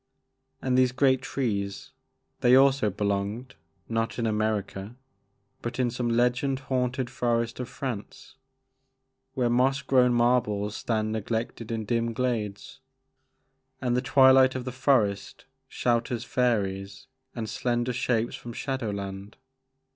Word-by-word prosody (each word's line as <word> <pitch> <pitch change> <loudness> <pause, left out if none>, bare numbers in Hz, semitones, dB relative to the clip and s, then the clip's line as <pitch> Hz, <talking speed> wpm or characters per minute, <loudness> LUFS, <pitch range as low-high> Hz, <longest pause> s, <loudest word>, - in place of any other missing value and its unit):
And 130 -1 +1
these 130 -1 +4
great 130 0 +3
trees, 105 -8 -3 0.3
— - - -46
^they 125 +2 +7
also 135 -4 +4
belonged, 100 +5 -2 0.3
not 115 0 -2
in 120 - -1
America 105 -1 -2 0.7
but 120 0 -5
in 125 -2 +1
some 120 0 -2
legend 125 +3 +1
haunted 130 -1 -1
forest 115 -1 -1
of 125 -1 -4
France, 130 +1 -6 1.0
where 125 -2 +1
moss 130 +3 +2
grown 125 -2 +4
marbles 120 -4 +1
stand 110 -2 -1
neg 110 -2 -4
lected 115 0 -3
in 110 -1 -2
dim 115 +1 0
glades, 110 -5 -3 1.0
and 125 -2 0
the 125 - +2
twilight 130 -1 +5
of 130 -1 -4
the 130 - -3
forest 115 -7 0 0.2
shelters 120 -1 -1
fairies 100 -6 -1 0.3
and 110 -2 -4
slender 120 +3 -1
shapes 120 -1 0
from 120 - -8
shadow 130 -2 -3
land. 100 0 -6
120 Hz, 130 wpm, -27 LUFS, 110-130 Hz, 1.0 s, ^they